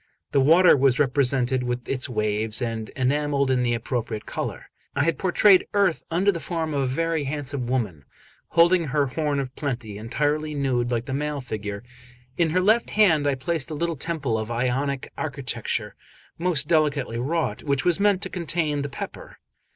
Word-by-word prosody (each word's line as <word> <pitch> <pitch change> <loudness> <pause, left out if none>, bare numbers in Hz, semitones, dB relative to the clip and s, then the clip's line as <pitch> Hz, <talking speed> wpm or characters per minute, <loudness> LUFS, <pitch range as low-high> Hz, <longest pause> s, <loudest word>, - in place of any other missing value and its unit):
The 140 - +3
water 165 +6 +6
was 135 -2 +3
represented 130 -2 +2
with 125 0 -3
its 130 0 -1
waves, 110 -1 -1
and 115 -3 -3
enamelled 140 +1 +1
in 130 -1 +2
the 120 -1 +1
appropriate 115 -2 -3
colour. - - -5 0.2
I 140 - +2
had 165 +2 0
portrayed 190 +1 +5
Earth 195 -5 +2
under 185 +5 +2
the 170 - -5
form 160 -2 -3
of 140 - 0
a - - +1
very 160 +3 -1
handsome 140 -3 -4
woman, 105 - -2 0.4
holding 170 +1 +4
her 145 0 +1
horn 145 +1 -1
of 130 -2 -4
plenty, 120 -8 -4
entirely 150 +6 -1
nude 130 -4 0
like 120 -1 -1
the 130 - -4
male 150 +1 -2
figure; 105 -4 -5 0.5
in 165 +2 +2
her 180 +4 +2
left 220 +5 +3
hand 165 -9 +3
I 140 - +2
placed 160 +3 -2
a 155 - -4
little 170 +2 -1
temple 145 -6 -2
of 110 +1 -5
Ionic 130 +3 -1
architecture, 140 -6 -3 0.4
most 165 -5 0
delicately 150 -7 +1
wrought, 135 -4 -1
which 140 -3 -1
was 175 0 +3
meant 200 -2 +2
to - - -3
contain 160 -4 -1
the 140 - -3
pepper. - - -8
140 Hz, 175 wpm, -24 LUFS, 125-160 Hz, 0.5 s, water